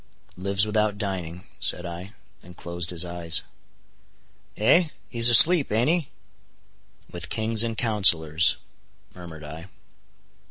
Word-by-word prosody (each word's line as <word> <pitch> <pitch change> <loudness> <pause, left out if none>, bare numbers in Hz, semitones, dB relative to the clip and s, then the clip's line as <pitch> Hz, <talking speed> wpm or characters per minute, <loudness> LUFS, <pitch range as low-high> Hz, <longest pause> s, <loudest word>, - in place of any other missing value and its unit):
"Lives 100 +2 -1
without 105 -1 -2
dining," 90 -4 -7 0.2
said 90 - +1
I, 90 +3 -10 0.3
and 90 0 -17
closed 85 0 -6
his 90 0 -4
eyes. 85 -1 -4 1.1
"Eh!—He's 120 -2 +2
asleep, 155 +6 +7
aint 115 +6 0
he?" 170 -5 -3 1.0
"With 85 -2 -8
kings 110 0 -1
and 115 -1 -5
counselors," 85 -8 +1 0.6
murmured 85 -4 -13
I. 80 +4 -11
95 Hz, 110 wpm, -23 LUFS, 85-110 Hz, 1.1 s, asleep